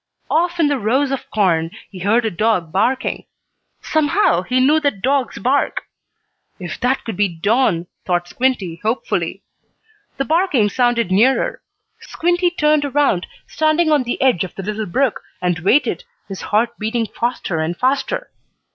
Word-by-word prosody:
Off 345 Hz, +2 st, +1 dB
in 320 Hz, -, +4 dB
the 285 Hz, -2 st, 0 dB
rows 260 Hz, +6 st, +1 dB
of 270 Hz, -, -4 dB
corn 170 Hz, -6 st, +1 dB, 0.2 s
he 190 Hz, -, -9 dB
heard 220 Hz, +6 st, +2 dB
a 220 Hz, -, 0 dB
dog 185 Hz, -3 st, 0 dB
barking. 250 Hz, +8 st, 0 dB, 0.6 s
Somehow 310 Hz, -, +2 dB
he 250 Hz, +8 st, 0 dB
knew 290 Hz, +5 st, +4 dB
that 285 Hz, -11 st, -2 dB
dog's 270 Hz, -1 st, 0 dB
bark. 270 Hz, +3 st, 0 dB, 0.8 s
"If 180 Hz, -2 st, -6 dB
that 255 Hz, +2 st, 0 dB
could 225 Hz, -, -4 dB
be 205 Hz, +2 st, +2 dB
Don!" 185 Hz, +1 st, +1 dB, 0.2 s
thought 175 Hz, -1 st, -1 dB
Squinty, 215 Hz, -8 st, -1 dB
hopefully. 225 Hz, +4 st, -2 dB, 0.7 s
The 275 Hz, -, -1 dB
barking 315 Hz, -, +2 dB
sounded 240 Hz, -3 st, +1 dB
nearer. 235 Hz, +8 st, +2 dB, 0.4 s
Squinty 350 Hz, +1 st, 0 dB
turned 305 Hz, -3 st, +2 dB
around, 280 Hz, -10 st, +1 dB, 0.2 s
standing 315 Hz, +1 st, +1 dB
on 295 Hz, -2 st, +4 dB
the 245 Hz, -1 st, -3 dB
edge 250 Hz, -10 st, +3 dB
of 185 Hz, -, -8 dB
the 195 Hz, -, -6 dB
little 215 Hz, +2 st, -3 dB
brook, 255 Hz, +7 st, 0 dB, 0.2 s
and 180 Hz, -1 st, -1 dB
waited, 255 Hz, -, +2 dB, 0.2 s
his 195 Hz, -2 st, -7 dB
heart 225 Hz, +3 st, +1 dB
beating 225 Hz, +2 st, -1 dB
faster 230 Hz, -7 st, -3 dB
and 160 Hz, +2 st, -2 dB
faster. 280 Hz, -, -1 dB
240 Hz, 155 wpm, -19 LUFS, 195-285 Hz, 0.8 s, in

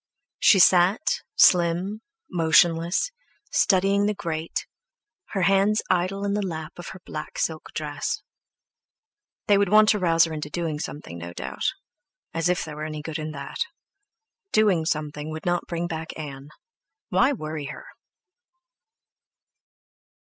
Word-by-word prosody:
She 200 Hz, -, +6 dB
sat, 185 Hz, -, +4 dB
slim, 180 Hz, +4 st, +4 dB, 0.3 s
motionless, 170 Hz, -, +3 dB, 0.4 s
studying 195 Hz, +1 st, +3 dB
the 210 Hz, -, 0 dB
grate, 165 Hz, -4 st, -3 dB, 0.6 s
her 195 Hz, -3 st, -2 dB
hands 195 Hz, +3 st, +3 dB
idle 185 Hz, +3 st, 0 dB
in 200 Hz, -, 0 dB
the 205 Hz, -, 0 dB
lap 160 Hz, -5 st, -5 dB
of 175 Hz, -, -7 dB
her 185 Hz, -, -8 dB
black 155 Hz, 0 st, -7 dB
silk 160 Hz, -1 st, -2 dB
dress. 145 Hz, -2 st, -3 dB, 1.2 s
They 205 Hz, -2 st, +4 dB
would 200 Hz, -2 st, +2 dB
want 215 Hz, +1 st, +6 dB
to 210 Hz, -, +3 dB
rouse 165 Hz, -2 st, +4 dB
her 165 Hz, -1 st, -1 dB
into 150 Hz, -1 st, -5 dB
doing 160 Hz, -2 st, -3 dB
something, 85 Hz, -, -7 dB
no 85 Hz, +1 st, -7 dB
doubt. 65 Hz, -4 st, -3 dB, 0.6 s
As 165 Hz, +2 st, 0 dB
if 180 Hz, -, 0 dB
there 150 Hz, -2 st, -8 dB
were 155 Hz, -, -4 dB
any 155 Hz, -1 st, -5 dB
good 160 Hz, 0 st, -4 dB
in 155 Hz, 0 st, -4 dB
that! 140 Hz, 0 st, -7 dB, 0.9 s
Doing 200 Hz, -7 st, +3 dB
something 150 Hz, -1 st, -2 dB
would 155 Hz, 0 st, -7 dB
not 175 Hz, 0 st, 0 dB
bring 170 Hz, 0 st, -2 dB
back 160 Hz, -1 st, -5 dB
Ann! 140 Hz, -2 st, -7 dB, 0.6 s
Why -, -, +3 dB
worry 155 Hz, -, -4 dB
her? -, -, -8 dB
165 Hz, 140 wpm, -25 LUFS, 155-195 Hz, 1.2 s, She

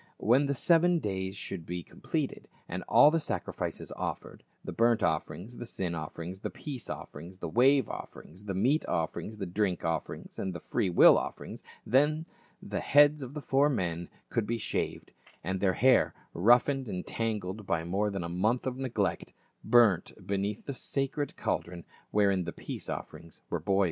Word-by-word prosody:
When 130 Hz, +7 st, +3 dB
the 140 Hz, -, 0 dB
seven 175 Hz, +4 st, +4 dB
days 95 Hz, -, -3 dB
should 95 Hz, -3 st, -5 dB
be 90 Hz, +1 st, -5 dB
completed, -, -, -4 dB, 0.2 s
and 90 Hz, +2 st, -4 dB
all 150 Hz, -, +7 dB
the 165 Hz, -, +2 dB
sacrifices 150 Hz, -, -4 dB
offered, -, -, -5 dB, 0.2 s
the -, -, -4 dB
burnt 115 Hz, 0 st, +3 dB
offerings, 90 Hz, +8 st, -2 dB
the 120 Hz, -, -6 dB
sin 90 Hz, -6 st, -3 dB
offerings, 85 Hz, +3 st, -6 dB
the -, -, -4 dB
peace 135 Hz, -6 st, -7 dB
offerings, 85 Hz, +6 st, -8 dB
the -, -, -5 dB
wave 130 Hz, -, +4 dB
offerings, 95 Hz, +6 st, -9 dB
the 95 Hz, -2 st, -3 dB
meat 135 Hz, -, +2 dB
offerings, 85 Hz, +6 st, -2 dB
the 100 Hz, -, -3 dB
drink 90 Hz, 0 st, -1 dB
offerings 80 Hz, 0 st, -3 dB
and 95 Hz, -2 st, -3 dB
the -, -, -4 dB
free 95 Hz, -, -1 dB
will 85 Hz, -, +7 dB
offerings, -, -, -7 dB, 0.2 s
then 150 Hz, +6 st, +3 dB, 0.4 s
the -, -, -3 dB
heads 145 Hz, +1 st, +5 dB
of 130 Hz, +2 st, -7 dB
the 150 Hz, -, -5 dB
four 140 Hz, +2 st, +3 dB
men 85 Hz, -, -2 dB, 0.2 s
could 115 Hz, -, 0 dB
be 115 Hz, -, 0 dB
shaved, 110 Hz, -, -3 dB, 0.3 s
and 95 Hz, +3 st, -2 dB
their 95 Hz, -1 st, +2 dB
hair, 130 Hz, +3 st, +4 dB, 0.2 s
roughened 125 Hz, +7 st, +4 dB
and 90 Hz, -3 st, -4 dB
tangled 105 Hz, -3 st, -3 dB
by 85 Hz, -3 st, 0 dB
more 100 Hz, +5 st, 0 dB
than 100 Hz, -3 st, -3 dB
a -, -, -3 dB
month 105 Hz, +9 st, 0 dB
of 130 Hz, -1 st, -2 dB
neglect,* 110 Hz, -9 st, -2 dB, 0.3 s
burnt 110 Hz, -6 st, +4 dB
beneath 100 Hz, +2 st, -2 dB
the 140 Hz, -, -4 dB
sacred 135 Hz, +2 st, -3 dB
cauldron 85 Hz, -2 st, -3 dB, 0.2 s
wherein 100 Hz, -3 st, +2 dB
the 85 Hz, -, -3 dB
peace -, -, -6 dB
offerings 85 Hz, -1 st, -7 dB
were -, -, 0 dB
boiling. 95 Hz, 0 st, +1 dB
105 Hz, 175 wpm, -30 LUFS, 90-130 Hz, 0.4 s, all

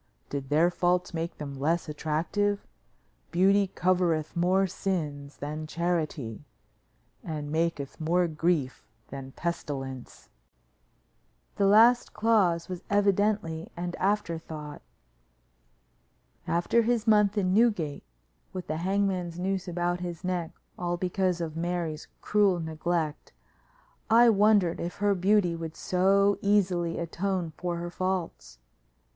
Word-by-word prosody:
Did 140 Hz, -2 st, -4 dB
their 160 Hz, +4 st, +4 dB
faults 180 Hz, +1 st, 0 dB
make 165 Hz, 0 st, -4 dB
them 145 Hz, -2 st, -6 dB
less 165 Hz, +5 st, 0 dB
attractive? 165 Hz, +7 st, -1 dB, 0.6 s
Beauty 195 Hz, +3 st, +3 dB
covereth 175 Hz, -4 st, 0 dB
more 185 Hz, +3 st, +3 dB
sins 155 Hz, -7 st, -3 dB
than 155 Hz, +2 st, -5 dB
charity 155 Hz, -8 st, -2 dB, 0.8 s
and 150 Hz, -5 st, -5 dB
maketh 160 Hz, -3 st, -2 dB
more 175 Hz, +3 st, +2 dB
grief 155 Hz, -4 st, -1 dB, 0.2 s
than 135 Hz, -1 st, -7 dB
pestilence." 135 Hz, -7 st, -5 dB, 1.3 s
The 200 Hz, -, +3 dB
last 230 Hz, +4 st, +5 dB
clause 205 Hz, -7 st, +2 dB
was 180 Hz, -1 st, -6 dB
evidently 200 Hz, -4 st, +1 dB
an 175 Hz, 0 st, -3 dB
afterthought. 165 Hz, -7 st, -2 dB, 1.7 s
After 175 Hz, +7 st, +2 dB
his 230 Hz, -1 st, 0 dB
month 210 Hz, -2 st, +4 dB
in 185 Hz, -2 st, +1 dB
Newgate 200 Hz, -10 st, +2 dB, 0.5 s
with 185 Hz, -1 st, -5 dB
the 155 Hz, -, -3 dB
hangman's 185 Hz, -1 st, -1 dB
noose 190 Hz, +1 st, -2 dB
about 175 Hz, 0 st, -1 dB
his 175 Hz, 0 st, -6 dB
neck 180 Hz, -3 st, -2 dB, 0.3 s
all 175 Hz, 0 st, -1 dB
because 185 Hz, 0 st, 0 dB
of 160 Hz, -2 st, -4 dB
Mary's 170 Hz, -2 st, -3 dB
cruel 200 Hz, -4 st, +3 dB
neglect, 160 Hz, -1 st, -3 dB, 0.8 s
I 235 Hz, +2 st, +7 dB
wondered 205 Hz, -4 st, +3 dB
if 170 Hz, +1 st, -4 dB
her 205 Hz, 0 st, +2 dB
beauty 190 Hz, -2 st, +2 dB
would 165 Hz, -1 st, -6 dB
so 195 Hz, +2 st, +2 dB
easily 180 Hz, -4 st, +1 dB
atone 175 Hz, 0 st, -2 dB
for 175 Hz, +1 st, -3 dB
her 175 Hz, 0 st, -5 dB
faults. 185 Hz, -, -3 dB
175 Hz, 115 wpm, -28 LUFS, 160-195 Hz, 1.7 s, I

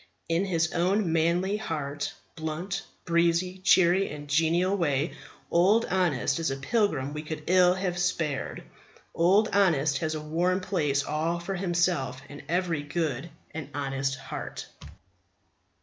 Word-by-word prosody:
In 165 Hz, +4 st, +1 dB
his 170 Hz, -3 st, 0 dB
own 180 Hz, +1 st, +1 dB
manly, 175 Hz, +5 st, +2 dB
hearty, 145 Hz, -7 st, -3 dB, 0.3 s
blunt, 165 Hz, +4 st, -3 dB, 0.2 s
breezy, 170 Hz, +2 st, +1 dB
cheery, 185 Hz, 0 st, +4 dB
and 145 Hz, 0 st, -8 dB
genial 165 Hz, +6 st, +2 dB
way 150 Hz, -4 st, 0 dB, 0.4 s
Old 200 Hz, +7 st, +4 dB
Honest 175 Hz, -6 st, +1 dB
is 165 Hz, -, 0 dB
a 135 Hz, -, -2 dB
pilgrim 145 Hz, -, 0 dB
we 150 Hz, -, -4 dB
could 155 Hz, 0 st, -6 dB
ill 180 Hz, 0 st, +5 dB
have 180 Hz, -2 st, -2 dB
spared. 155 Hz, -6 st, -1 dB, 0.5 s
Old 195 Hz, +6 st, +4 dB
Honest 155 Hz, -8 st, +2 dB
has 155 Hz, -1 st, -2 dB
a -, -, -3 dB
warm 170 Hz, +5 st, 0 dB
place 150 Hz, -7 st, 0 dB
all 160 Hz, +4 st, -1 dB
for 175 Hz, +3 st, -4 dB
himself 175 Hz, -8 st, 0 dB
in 145 Hz, -, -9 dB
every 175 Hz, -3 st, 0 dB
good 145 Hz, -1 st, -2 dB, 0.2 s
and 150 Hz, -3 st, -6 dB
honest 135 Hz, -1 st, -1 dB
heart. 135 Hz, -, -7 dB
170 Hz, 135 wpm, -27 LUFS, 150-185 Hz, 0.5 s, ill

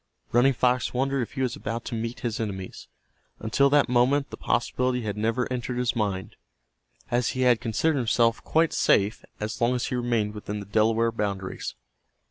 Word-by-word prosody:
Running 125 Hz, +3 st, +4 dB
Fox 125 Hz, 0 st, +1 dB
wondered 135 Hz, +1 st, +1 dB
if 120 Hz, -, -5 dB
he 135 Hz, -1 st, -1 dB
was 125 Hz, -2 st, -1 dB
about 115 Hz, +1 st, -4 dB
to -, -, -5 dB
meet 115 Hz, +1 st, -4 dB
his 115 Hz, -3 st, -2 dB
enemies. 95 Hz, -4 st, -5 dB, 0.5 s
Until 125 Hz, +5 st, +2 dB
that 145 Hz, 0 st, +4 dB
moment 130 Hz, +3 st, +2 dB
the -, -, -5 dB
possibility 125 Hz, -1 st, 0 dB
had 105 Hz, -2 st, -3 dB
never 115 Hz, +3 st, 0 dB
entered 125 Hz, 0 st, -3 dB
his 125 Hz, -1 st, 0 dB
mind, 100 Hz, -4 st, -2 dB, 0.7 s
as 120 Hz, -1 st, +2 dB
he -, -, 0 dB
had 125 Hz, -2 st, +4 dB
considered 135 Hz, +6 st, +1 dB
himself 115 Hz, -1 st, +2 dB
quite 160 Hz, 0 st, +2 dB
safe 100 Hz, +2 st, +2 dB, 0.2 s
as 110 Hz, +2 st, -4 dB
long 120 Hz, +2 st, +3 dB
as 125 Hz, -, -1 dB
he -, -, -2 dB
remained 120 Hz, -4 st, 0 dB
within 105 Hz, 0 st, -5 dB
the 100 Hz, -, -7 dB
Delaware 110 Hz, +3 st, +2 dB
boundaries. 100 Hz, -4 st, -4 dB
120 Hz, 180 wpm, -26 LUFS, 110-125 Hz, 0.7 s, Running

